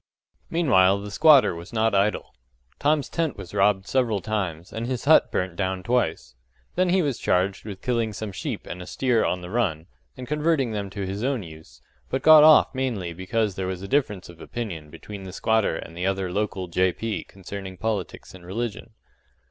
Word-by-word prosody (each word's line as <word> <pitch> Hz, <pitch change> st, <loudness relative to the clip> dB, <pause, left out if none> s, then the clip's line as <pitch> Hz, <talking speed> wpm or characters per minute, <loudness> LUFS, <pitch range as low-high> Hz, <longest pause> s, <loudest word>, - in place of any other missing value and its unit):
Meanwhile 100 Hz, -, +4 dB
the 105 Hz, 0 st, -7 dB
squatter 150 Hz, -, +6 dB
was 85 Hz, +1 st, -9 dB
not 110 Hz, -1 st, +1 dB
idle. 100 Hz, +1 st, 0 dB, 0.5 s
Tom's 145 Hz, 0 st, +2 dB
tent 165 Hz, -4 st, -2 dB
was 90 Hz, -, -9 dB
robbed 100 Hz, -1 st, +2 dB
several 120 Hz, -5 st, +1 dB
times, 95 Hz, -5 st, -3 dB
and 115 Hz, +1 st, -3 dB
his 130 Hz, -1 st, -3 dB
hut 155 Hz, +2 st, +5 dB
burnt 90 Hz, -1 st, -2 dB
down 95 Hz, 0 st, -2 dB
twice. 120 Hz, -, -1 dB, 0.4 s
Then 185 Hz, 0 st, +1 dB
he 185 Hz, 0 st, +3 dB
was 140 Hz, -6 st, -1 dB
charged 95 Hz, +3 st, 0 dB
with 100 Hz, -3 st, -8 dB
killing 115 Hz, -3 st, 0 dB
some 105 Hz, 0 st, -5 dB
sheep 95 Hz, -, -5 dB
and 90 Hz, -, -7 dB
a 90 Hz, -, -9 dB
steer 125 Hz, +3 st, +1 dB
on 90 Hz, -, -1 dB
the 90 Hz, 0 st, -8 dB
run, 95 Hz, -9 st, 0 dB, 0.3 s
and 125 Hz, -1 st, -7 dB
converting 150 Hz, -3 st, +1 dB
them 100 Hz, -2 st, -3 dB
to 100 Hz, 0 st, -5 dB
his 100 Hz, +3 st, -4 dB
own 130 Hz, -5 st, 0 dB
use, 80 Hz, -1 st, -14 dB, 0.3 s
but 130 Hz, -, -2 dB
got 155 Hz, -1 st, +9 dB
off 155 Hz, -3 st, +7 dB
mainly 115 Hz, -10 st, -2 dB
because 105 Hz, +4 st, -1 dB
there 95 Hz, 0 st, -4 dB
was 95 Hz, 0 st, -4 dB
a -, -, -5 dB
difference 110 Hz, -9 st, 0 dB
of 85 Hz, -1 st, -14 dB
opinion 90 Hz, -11 st, -6 dB
between 100 Hz, +6 st, -9 dB
the 95 Hz, -1 st, -8 dB
squatter 110 Hz, -1 st, +1 dB
and 85 Hz, -, -8 dB
the 90 Hz, +2 st, -2 dB
other 95 Hz, -2 st, -1 dB
local 100 Hz, -1 st, -2 dB
J.P. 95 Hz, +5 st, -1 dB
concerning 95 Hz, -1 st, -8 dB
politics 105 Hz, -4 st, -4 dB
and 95 Hz, -2 st, -13 dB
religion. 115 Hz, +4 st, -5 dB
100 Hz, 190 wpm, -24 LUFS, 95-120 Hz, 0.5 s, got